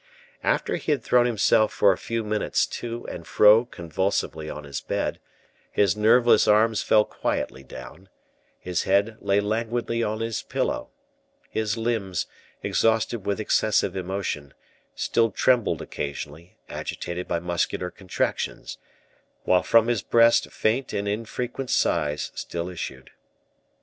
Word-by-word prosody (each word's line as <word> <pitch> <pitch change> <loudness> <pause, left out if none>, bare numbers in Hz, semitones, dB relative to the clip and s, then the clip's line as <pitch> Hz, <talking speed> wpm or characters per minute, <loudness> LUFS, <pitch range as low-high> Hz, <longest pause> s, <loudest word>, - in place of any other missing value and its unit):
After - - 0
he - - -2
had 135 -5 -3
thrown 120 -1 +4
himself 110 -1 +3
for 100 - +4
a - - +1
few 115 -1 -3
minutes 105 0 0
to 120 0 -6
and 85 -1 -7
fro 105 +3 +6
convulsively 85 -4 -2
on 75 - -7
his 70 -1 -5
bed, - - -2 0.5
his 100 -2 +2
nerveless 115 +3 +5
arms 110 +1 +4
fell 105 -1 +4
quietly 65 - -3
down; 70 +9 -11 0.5
his 90 -2 -2
head 100 +3 +2
lay 100 +1 +2
languidly 115 +2 -1
on 110 -1 -1
his 115 -1 -2
pillow; - - -2 0.6
his 110 0 -1
limbs, 110 -6 -1 0.4
exhausted 115 -1 +1
with 100 +1 0
excessive 105 -3 +1
emotion, 90 -7 -4 0.4
still 115 -1 +1
trembled 110 -6 +2
occasionally, 75 +4 -6
agitated 85 +1 -5
by - - 0
muscular 90 +1 -2
contractions; 95 -3 -3 0.6
while 90 -1 +3
from 115 +3 +4
his 120 -3 +1
breast 115 0 +4
faint 120 +5 0
and 100 0 -2
infrequent 120 +4 -3
sighs 75 0 0
still 85 +1 -4
issued. 65 -7 -7
105 Hz, 130 wpm, -25 LUFS, 90-115 Hz, 0.6 s, fro